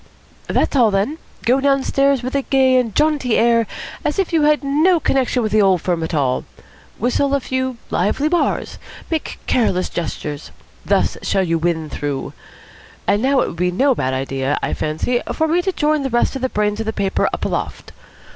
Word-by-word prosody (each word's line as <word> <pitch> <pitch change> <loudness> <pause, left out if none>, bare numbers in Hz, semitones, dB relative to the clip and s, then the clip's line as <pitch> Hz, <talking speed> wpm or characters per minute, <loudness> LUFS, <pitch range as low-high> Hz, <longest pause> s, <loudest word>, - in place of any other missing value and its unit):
"That's - - 0
all, 240 -5 +5
then. 205 +11 -1 0.3
Go 255 +3 +4
downstairs 275 -1 +2
with 255 - -4
a 280 - +1
gay 265 -1 +3
and 230 -5 0
jaunty 295 -6 +2
air, 230 -1 +3 0.4
as 300 - -1
if 385 -3 -1
you 320 - +3
had 300 0 +3
no 315 +6 +3
connection 260 -4 +1
with 215 - -1
the 215 0 +4
old 190 -2 +4
firm 175 -2 0
at 160 +1 -3
all. 130 -4 0 0.5
Whistle 275 +5 +1
a - - +1
few 260 -1 -2
lively 210 - +1
bars. 345 +1 -1 0.3
Make 320 -2 -2
careless 185 -7 +1
gestures. 150 -3 -5 0.3
Thus - - +1
shall 195 - +1
you 165 -2 0
win 160 -1 -1
through. 145 -2 -4 0.7
And 205 - +2
now 270 +1 +3
it - - 0
would 170 - -9
be 180 +1 +1
no 260 +10 +2
bad 130 - -1
idea, 135 +1 -1
I - - -1
fancy, 160 +11 -1
for 320 - 0
me 340 +3 +2
to 380 - -1
join 305 -3 +1
the 270 - -2
rest 240 +3 +1
of 270 - -4
the 260 - 0
brains 210 -1 -1
of 225 - -3
the 220 - -1
paper 195 -2 0
up - - -3
aloft. - - -4
245 Hz, 195 wpm, -19 LUFS, 185-280 Hz, 0.7 s, all